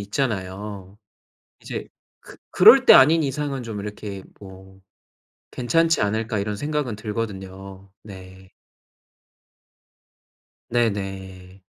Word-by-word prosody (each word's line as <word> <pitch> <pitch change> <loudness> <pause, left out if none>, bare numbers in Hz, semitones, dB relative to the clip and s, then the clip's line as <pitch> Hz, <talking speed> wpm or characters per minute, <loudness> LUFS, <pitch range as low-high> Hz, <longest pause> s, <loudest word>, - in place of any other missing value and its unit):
있잖아요. 100 -3 -5 0.6
이제 - - -6 0.3
그 - - -15
그럴 - - +7
때 - - +8
아닌 160 +5 +6
이상은 140 -2 -3
좀 110 -3 -6
이렇게 105 -1 -7 0.2
뭐 95 -1 -14 0.7
괜찮지 165 +7 +1
않을까 110 +1 -1
이런 105 +1 -3
생각은 145 -1 -3
들거든요. 100 -3 -7
네. 95 -2 -13 2.2
네네. 95 -5 -3
105 Hz, 195 characters per minute, -22 LUFS, 95-115 Hz, 2.2 s, 때